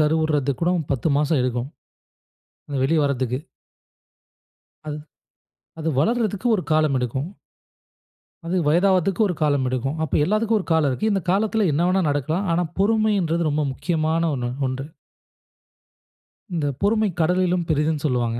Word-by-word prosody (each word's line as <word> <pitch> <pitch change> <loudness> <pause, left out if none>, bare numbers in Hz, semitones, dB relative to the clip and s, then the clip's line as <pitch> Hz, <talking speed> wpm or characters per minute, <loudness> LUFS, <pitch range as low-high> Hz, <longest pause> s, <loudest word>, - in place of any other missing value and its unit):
கருவுறது 150 -2 +1
கூட 170 +1 +2 0.2
10 135 +3 0
மாசம் 150 -1 +2
எடுக்கும். 125 +1 -2 1.2
வெளிய 155 +4 +2
வரதுக்கு. 130 -2 -1 1.5
அது 150 - -4 0.8
அது 160 - -2
வளர்றதுக்கு 220 - 0
ஒரு 180 - -3
காலம் 155 -3 +3
எடுக்கும். 130 +6 -3 1.2
அது 180 +2 0
வயதாவதுக்கு 185 +4 +2
ஒரு 190 - 0
காலம் 145 -3 +2
எடுக்கும். 130 +4 -2
அப்ப 155 - 0
எல்லாத்துக்கும் 215 +3 +1
ஒரு 185 - -6
காலம் 160 -3 +3
இருக்கு. 215 - 0
இந்த 195 -2 0
காலத்தில 210 +2 +2
என்ன 165 +5 +1
வேணா 190 +1 +2
நடக்கலாம். 155 +7 -1
ஆனா 175 +1 +1 0.2
பொறுமைன்றது 200 -6 +2
ரொம்ப 150 0 0
முக்கியமான 165 +2 0
ஒண்ணு 120 -2 -3 0.2
ஒன்று. 130 +1 -4 1.7
இந்த 155 -4 -1
பொறுமை 215 0 +2
கடலிலும் 180 +1 +1
பெரிதுன்னு 150 -1 0
சொல்லுவாங்க. 120 -4 0
160 Hz, 125 wpm, -22 LUFS, 140-185 Hz, 1.7 s, காலம்